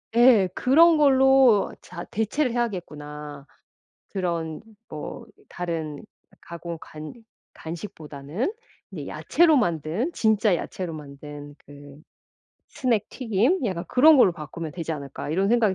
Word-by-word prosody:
예 235 -5 +6
‘그런 320 +6 +5
걸로 265 -6 +5
자 175 -1 -8
대체를 235 +6 0
해야겠구나.‘ 150 - -5 0.7
그런 170 -4 -3 0.3
뭐 155 - -7 0.2
다른 165 -4 -4 0.4
가공 170 0 -7
간 155 0 -9 0.4
간식보다는 160 - -5 0.4
이 - - -6
야채로 330 -3 +3
만든 170 - -1
진짜 220 -3 +2
야채로 180 0 -5
만든 145 0 -10
그 145 0 -13 0.7
스낵 230 -5 -1
튀김? 250 - 0
약간 180 -4 -3
‘그런 300 +5 +6
걸로 245 -8 +6
바꾸면 160 0 -7
되지 165 -2 -5
않을까.‘ 140 -1 -6
이런 190 +5 +1
생각이 220 -4 +3
180 Hz, 245 characters per minute, -24 LUFS, 155-240 Hz, 0.7 s, 예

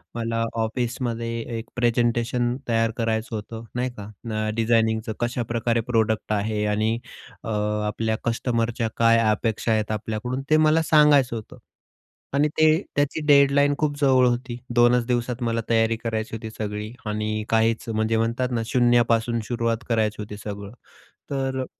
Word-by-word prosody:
मला 115 0 -1 0.2
ऑफिसमध्ये 115 0 -2 0.3
एक 115 - -6
प्रेझेंटेशन 120 0 +1
तयार 115 -1 +2
करायचं 115 0 -1
होतं 110 +2 -6
नाही 125 +1 0
का? 100 0 -7 0.2
न, 110 -1 -2
डिझायनिंगचं, 110 -1 +1
कशाप्रकारे 120 -1 -1
प्रोडक्ट 110 -1 +1
आहे? 105 0 -1
आणि 110 +2 +1 0.5
अ, - - -5 0.4
आपल्या 110 +1 -1
कस्टमरच्या 115 0 -1
काय 115 0 +5
अपेक्षा 110 +1 0
आहेत 110 -1 0
आपल्याकडून? 110 +5 -3
ते 155 - +5
मला 155 +1 +4
सांगायचं 145 -6 +5
होतं. 110 - -8 0.8
आणि 145 +2 +3
ते 155 - +5 0.3
त्याची 145 +2 0
डेडलाईन 145 0 +5
खूप 145 -2 -1
जवळ 130 -3 +4
होती. 120 0 -2 0.2
2च 120 0 +4
दिवसात 125 0 -1
मला 115 0 0
तयारी 115 0 +3
करायची 110 -1 -3
होती 110 0 -6
सगळी 105 0 -5
आणि 110 0 -2
काहीच 115 +1 +1
म्हणजे 110 0 0
म्हणतात 115 +3 0
ना 115 -2 0
शून्यापासून 120 -1 +2
सुरुवात 115 -1 -1
करायची 110 -2 0
होती 105 0 -7
सगळं. 100 -1 -7 0.6
तर 135 -1 -1
अ - - -3
115 Hz, 145 wpm, -24 LUFS, 110-125 Hz, 0.8 s, काय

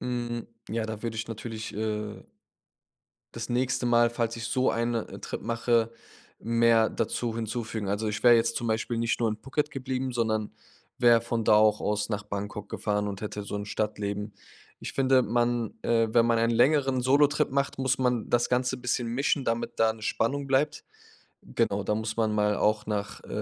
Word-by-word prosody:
Mhm, 120 -1 -3 0.2
ja, 115 0 -2
da 110 -1 -6
würde 115 -1 -3
ich 110 +1 -3
natürlich, 110 0 -6
äh 105 0 -3 1.1
das 115 0 -6
nächste 125 +1 0
Mal, 120 -1 +4
falls 115 -1 -2
ich 115 -1 -5
so 130 +2 +1
eine, 115 -1 -1
äh, - - -9
Trip - - -6
mache, 115 0 +1 0.5
mehr 115 -1 +3
dazu 115 -2 -2
hinzufügen. 110 -2 -3
Also, 105 +2 -1
ich 105 0 -3
wäre 120 -1 +8
jetzt 115 0 +1
zum 120 - -2
Beispiel 110 +1 -1
nicht 115 0 0
nur 115 -2 +2
in 105 - -3
Phuket 135 +6 -2
geblieben, 130 -2 -3
sondern 110 -3 -1 0.5
wäre 120 -2 +5
von 115 -1 -2
da - - +5
auch 105 0 +4
aus 105 +1 -1
nach 105 -1 -2
Bangkok 105 0 -5
gefahren 105 0 -1
und 100 0 -5
hätte 105 -1 -4
so 100 - -5
'n 100 0 -4
Stadtleben. 105 -1 -3 0.5
Ich - - -6
finde, 130 -1 +4
man 120 0 0
äh, 115 -1 +2
wenn 115 0 +4
man 115 -1 +3
einen 115 +1 +2
längeren 135 0 +3
Solotrip 145 +3 +3
macht, 140 0 0
muss 130 -1 +1
man 125 -3 0
das 120 0 +2
Ganze 125 +1 +1
bisschen 125 -1 -1
mischen, 135 +3 0
damit 115 -1 -1
da 110 0 +4
'ne 110 - -15
Spannung 135 +6 -1
bleibt. 135 +2 +1 0.6
Genau, 100 0 -1
da 105 - +1
muss 110 0 -3
man 110 -2 +1
mal 105 0 +2
auch 105 0 +1
nach, 105 -1 -3
äh, - - -14
115 Hz, 190 wpm, -27 LUFS, 110-120 Hz, 1.1 s, wäre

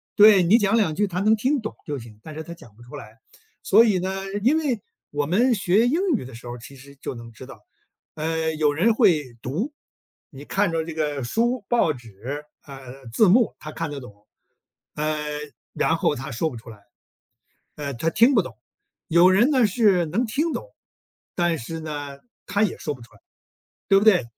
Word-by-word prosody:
对， 210 -2 +8
你 180 +6 +5
讲 205 -1 +2
2 185 -9 +1
句 205 +4 +2
他 180 -1 -3
能 215 +3 +4
听 265 +6 0
懂 220 - -6
就 145 -3 -4
行， 115 -2 -13
但 155 - -9
是 155 - -6
他 170 0 -9
讲 115 -10 -16
不 120 - -19
出 120 - -11
来。 115 +1 -11 0.4
所 230 - +6
以 195 -5 +2
呢 190 +1 -3 0.2
因 280 +6 +4
为 265 -10 -1 0.3
我 145 0 -1
们 235 - +3
学 200 +2 +2
英 315 +8 +1 0.2
语 200 - -4
的 130 - -11
时 120 +2 -11
候 120 - -5
儿 - - -9
其 125 +4 -12
实 140 +2 -15
就 135 - -6
能 115 -1 -11
知 110 - -11
道， 135 - -12 0.6
呃， 160 0 -1
有 150 -1 +2
人 215 +9 +3
会 150 - +2
读， 200 - -3 0.6
你 140 -2 -12
看 195 +1 0
着 160 -1 -1
这 165 - -6
个 150 -3 -2
书、 235 - 0
报 235 -9 +2
纸， 125 +3 -7 0.2
呃， 135 -1 -11
字 210 - +5
幕 225 +5 +4
他 155 0 -8
看 165 -2 -4
得 145 - -5
懂， 105 -4 -14 0.7
呃， 155 0 -1 0.5
然 160 - +1
后 150 - +1
他 135 -2 -6
说 155 +8 -1
不 125 - -10
出 115 - -12
来。 105 -2 -12 1.0
呃， 140 -2 -5
他 160 +8 -1
听 235 +9 +4
不 210 - +4
懂。 120 -7 -11 0.5
有 170 +3 +6
人 220 +9 +4
呢， 260 -6 +4
是 195 -5 +3
能 220 +11 -1
听 305 +9 -1
懂， - - -5 0.7
但 175 -2 +1
是 165 +8 -6
呢， 145 -3 -6 0.3
他 200 +3 0
也 205 - -2
说 150 - -3
不 130 - -15
出 115 - -17
来， 105 - -21 0.7
对 195 -1 +6
不 205 - +1
对？ 185 - +5
160 Hz, 220 characters per minute, -23 LUFS, 135-210 Hz, 1.0 s, 对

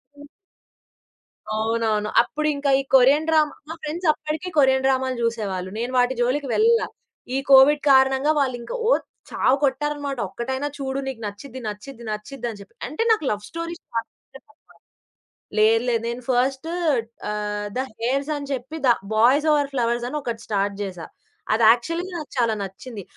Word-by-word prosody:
హ్మ్. 290 0 -13 1.3
అవునవును. 220 -1 0
అప్పుడింకా 295 -2 -1
ఈ - - +1
కొరియన్‌డ్రామా 300 +4 +4 0.2
మా 325 - -5
ఫ్రెండ్స్ 325 +4 -3
అప్పడికే 315 +4 -5
కొరియన్‌డ్రామాలు 265 -1 +3
చూసేవాళ్ళు. 200 -5 -2
నేను 240 +2 -2
వాటి 250 +1 +3
జోలికి 270 +4 0
వెళ్ళలా, 460 +1 +3 0.5
ఈ - - +2
కోవిడ్ 275 +2 +7
కారణంగా 265 +2 +5
వాళ్ళింకా 250 - -2
ఓ - - +4 0.4
చావకొట్టారనమాట 280 +1 0
"ఒక్కటైనా 260 +8 -3
చూడు, 270 -1 -3
నీకు 260 -4 -5
నచ్చిద్ది, 250 +6 -9
నచ్చిద్ది, 235 +4 -9
నచ్చిద్ది" 240 +4 -5
అని 215 - -8
చెప్పి. 200 - -15
అంటే 305 - -2
నాకు 430 -8 +2
లవ్ 210 -1 -2
స్టోరీస్ 335 0 -6
చాలా 230 0 0 0.2
ఇష్టం 270 0 -16
అనమాట. 290 - -27 0.9
లేదు, 220 +2 +5
లేదు 230 -2 0
నేను 240 +1 -5
ఫస్టు 265 +5 0 0.6
ఆహ్, 210 0 -3
'ద - - 0 0.2
హెయిర్స్' 275 +5 0
అని 285 -1 -6
చెప్పి 265 +4 -4
'ద - - +5 0.3
బాయ్స్ 255 +8 +4
ఓవర్ 290 -2 +1
ఫ్లవర్స్' 240 -1 0
అని 300 +4 -3
ఒకటి 235 -3 -4
స్టార్ట్ 200 -1 0
చేశా. 180 -4 -6 0.5
అది 225 +1 +3
యాక్చువల్లీ 330 +10 +1
నాకు 310 -3 -7
చాలా 230 -2 +2
నచ్చింది. 200 +3 -8
265 Hz, 150 wpm, -23 LUFS, 230-290 Hz, 1.3 s, కోవిడ్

